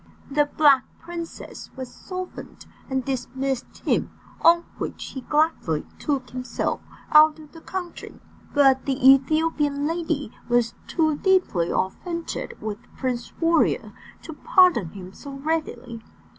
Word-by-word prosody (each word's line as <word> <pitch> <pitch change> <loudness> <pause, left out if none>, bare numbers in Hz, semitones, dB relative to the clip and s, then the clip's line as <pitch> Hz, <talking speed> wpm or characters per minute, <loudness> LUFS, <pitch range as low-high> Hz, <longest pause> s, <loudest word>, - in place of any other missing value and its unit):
The 295 +1 +3
Black 280 -4 +6 0.2
Princess 335 0 -8
was 260 -2 -7
softened, 370 -1 -8 0.2
and 265 -2 -1
dismissed 265 0 -3
him, - - +1 0.3
on 340 +1 +6 0.2
which - - -5
he 265 - -6
gladly 295 - +1
took 270 -4 -2
himself 255 0 -2 0.3
out 305 0 +7
of 305 -2 -14
the 325 - -13
country. 360 -1 -6 0.3
But 270 -3 +4
the 270 -2 0
Ethiopian 290 +1 +4
lady 320 -5 -2 0.2
was 240 -1 +2
too 315 -3 +1
deeply 365 - +2
offended 335 - -3
with 215 -1 -4 0.2
Prince 250 -2 -2
Warrior 330 0 +2 0.3
to 320 - -7
pardon 330 - +4
him 185 +1 -10
so 280 -1 -9
readily. 275 -5 -3
285 Hz, 125 wpm, -24 LUFS, 255-325 Hz, 0.3 s, out